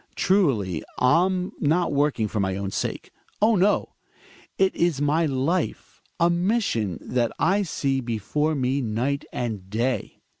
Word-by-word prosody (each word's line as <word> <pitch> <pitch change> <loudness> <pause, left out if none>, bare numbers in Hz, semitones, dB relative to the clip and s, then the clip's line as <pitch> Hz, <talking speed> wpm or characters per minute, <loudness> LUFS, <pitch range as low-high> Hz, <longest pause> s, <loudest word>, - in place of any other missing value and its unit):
Truly, 130 - +1
I'm 180 +7 +2
not 165 +2 +1
working 140 -6 +1
for 105 - -3
my 95 -1 0
own 100 -1 -3
sake. - - -4 0.3
Oh, 215 +2 +4
no! 195 +2 +2 0.7
It 190 0 +2
is 170 -5 +1
my 150 +3 +2
life 150 +6 -2
— - - -44
a 170 - +5
mission 175 - 0
that 120 -2 -1
I 195 +4 +2
see 135 -7 -1
before 125 +7 -1
me 135 +1 0
night 125 +5 -1
and 105 -6 -4
day. 120 +5 -2
140 Hz, 145 wpm, -24 LUFS, 115-175 Hz, 0.7 s, a